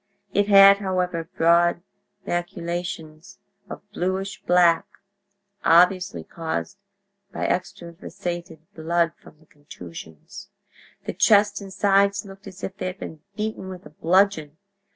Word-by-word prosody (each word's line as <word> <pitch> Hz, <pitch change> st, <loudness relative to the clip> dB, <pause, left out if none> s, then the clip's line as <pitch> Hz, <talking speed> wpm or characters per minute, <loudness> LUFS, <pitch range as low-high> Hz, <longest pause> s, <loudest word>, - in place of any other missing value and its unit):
It 205 Hz, 0 st, +2 dB
had, 200 Hz, -1 st, +8 dB
however, 180 Hz, -4 st, -2 dB
broad 170 Hz, +1 st, +3 dB, 0.4 s
maculations 175 Hz, -1 st, -5 dB, 0.3 s
of -, -, -9 dB
bluish 190 Hz, +1 st, -3 dB
black, 175 Hz, -2 st, +3 dB, 0.8 s
obviously 175 Hz, -, +3 dB
caused 160 Hz, -, -5 dB, 0.5 s
by -, -, -3 dB
extravasated 170 Hz, -1 st, -5 dB
blood 170 Hz, +1 st, 0 dB
from 155 Hz, +1 st, -18 dB
contusions. 85 Hz, -, -12 dB, 0.6 s
The -, -, -4 dB
chest 205 Hz, -1 st, +3 dB
and 195 Hz, -1 st, -9 dB
sides 200 Hz, 0 st, +2 dB
looked 195 Hz, +1 st, -13 dB
as 190 Hz, 0 st, -12 dB
if 190 Hz, -, -5 dB
they 185 Hz, -, -3 dB
had 185 Hz, +1 st, -6 dB
been 160 Hz, -5 st, -9 dB
beaten 215 Hz, -3 st, -4 dB
with 185 Hz, -1 st, -10 dB
a 150 Hz, -, -13 dB
bludgeon. 165 Hz, -2 st, +1 dB
175 Hz, 115 wpm, -23 LUFS, 165-195 Hz, 0.8 s, had